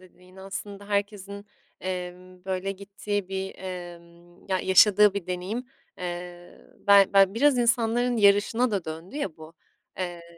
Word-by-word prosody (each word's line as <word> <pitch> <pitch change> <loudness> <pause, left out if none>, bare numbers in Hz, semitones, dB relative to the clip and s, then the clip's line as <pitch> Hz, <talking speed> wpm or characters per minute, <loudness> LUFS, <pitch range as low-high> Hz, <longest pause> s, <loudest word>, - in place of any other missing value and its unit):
dediğini. 185 +1 -17
Aslında 200 +1 -8
herkesin, 200 0 -3 0.3
emm, 180 0 -6
böyle, 190 +1 -2
gittiği 200 0 -4
bir, 190 0 -4
emm, 175 -1 -10
ya, 190 -1 +1
yaşadığı 205 +1 +5
bir 200 -3 -4
deneyim 185 +7 -4 0.3
Eee, 175 0 -7 0.3
ben 200 -1 +7
ben 195 0 +5
biraz 275 +2 +3
insanların 240 +1 +2
yarışına 215 +4 +3
da 195 -5 -2
döndü 165 - -8
ya 200 - -3
bu, 160 +1 -13 0.4
eee, 175 -2 -4
190 Hz, 135 wpm, -26 LUFS, 180-205 Hz, 0.4 s, ben